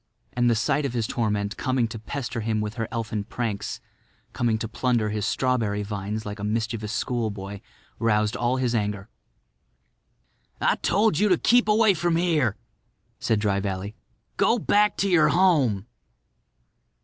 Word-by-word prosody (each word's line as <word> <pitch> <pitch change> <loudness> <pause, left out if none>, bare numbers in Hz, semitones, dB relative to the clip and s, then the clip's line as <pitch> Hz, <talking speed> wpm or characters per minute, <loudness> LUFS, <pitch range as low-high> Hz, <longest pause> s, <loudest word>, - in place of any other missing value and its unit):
And 120 -1 +2
the 115 - +3
sight 135 +6 +1
of 135 -3 -2
his 115 -3 0
torment 105 -3 -1
coming 130 -3 0
to 115 - -7
pester 120 +1 -4
him 110 0 -1
with 105 0 -3
her 115 -2 -3
elfin 110 -3 -3
pranks—coming 110 +1 -4
to 110 - -4
plunder 120 -2 0
his 105 0 -1
strawberry 115 -6 0
vines 105 +1 -4
like 105 0 -6
a - - -6
mischievous 110 0 -2
schoolboy—roused 105 0 -2
all 120 +1 0
his 125 -2 0
anger. 105 -2 -2 1.5
"I - - +2
told 205 -5 +2
you 210 +1 +3
to 180 - +4
keep 245 +4 +4
away 215 -1 +5
from 175 -1 0
here," 160 - +2 0.6
said 110 -2 +1
Dry 100 -2 +1
Valley. 100 +1 -4 0.4
"Go 235 - +3
back 210 -1 +2
to 200 - +1
your 175 -5 +5
home." 145 - +3
115 Hz, 150 wpm, -25 LUFS, 105-135 Hz, 1.5 s, away